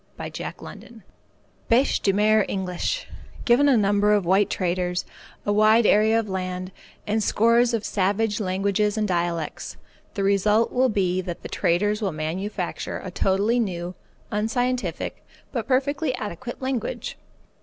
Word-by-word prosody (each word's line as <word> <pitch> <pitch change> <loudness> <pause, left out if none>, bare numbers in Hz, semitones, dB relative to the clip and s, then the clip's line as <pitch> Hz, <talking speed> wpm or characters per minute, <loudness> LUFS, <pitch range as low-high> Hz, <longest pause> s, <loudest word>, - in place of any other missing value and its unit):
CHAPTER - - -5 0.2
XVI 230 -3 -12 0.7
BÊCHE 250 +4 +3
DE 195 - +3
MER 215 +2 +4
ENGLISH 190 - -2 0.4
Given 265 +4 +5
a 260 - +5
number 205 0 +3
of 205 -3 +2
white 195 +3 +3
traders, 180 -1 -1 0.4
a 205 - +1
wide 215 +2 +5
area 220 +2 +4
of 225 - -3
land, 185 -1 -4 0.3
and 215 +1 0
scores 230 +3 +3
of 215 - -3
savage 205 +2 0
languages 200 +2 0
and 215 -1 +1
dialects, 170 -3 -2 0.4
the 200 - -1
result 210 +3 +3
will 255 +1 +3
be 185 -3 0
that 175 -2 -7
the - - -6
traders 205 +5 +1
will 200 -3 0
manufacture 175 +5 -4
a 185 - -6
totally 200 +6 +1
new, 180 -5 -2 0.4
unscientific, 245 +4 -2 0.3
but 235 -4 -3
perfectly 275 +1 +1
adequate, 240 +4 -6
language. 260 -4 -3
210 Hz, 140 wpm, -24 LUFS, 185-230 Hz, 0.7 s, Given